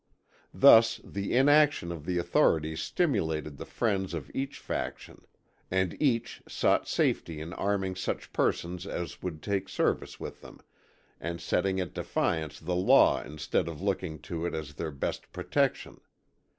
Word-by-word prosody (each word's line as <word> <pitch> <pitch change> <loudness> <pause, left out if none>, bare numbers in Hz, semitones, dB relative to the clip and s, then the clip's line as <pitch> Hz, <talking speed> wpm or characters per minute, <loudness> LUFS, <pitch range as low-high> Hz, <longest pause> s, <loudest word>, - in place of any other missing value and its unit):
Thus 115 0 +7
the 100 +3 -3
inaction 145 - +4
of 80 -3 -8
the 90 -1 0
authorities 80 -2 +2
stimulated 80 - -1
the - - -8
friends 95 -6 -1
of 80 - -6
each 135 +1 -3
faction, - - -6 0.4
and 95 -2 0
each 125 -6 0
sought - - +1
safety 80 -2 0
in 80 +3 -6
arming 95 -2 -1
such 95 - -4
persons 90 +2 -1
as 85 -3 -5
would 80 -4 -5
take 100 -2 -1
service - - -1
with - - -7
them, - - -13 0.6
and 85 0 -4
setting 95 +2 0
at 90 - -3
defiance 80 -2 -1
the 90 +2 -2
law 90 - +5
instead 75 +3 -2
of 80 -3 -6
looking 95 -4 -2
to 85 -2 -4
it 85 - -4
as 75 -2 -5
their 80 +3 -4
best 70 -2 -4
protection. - - -1
90 Hz, 150 wpm, -29 LUFS, 80-100 Hz, 0.6 s, Thus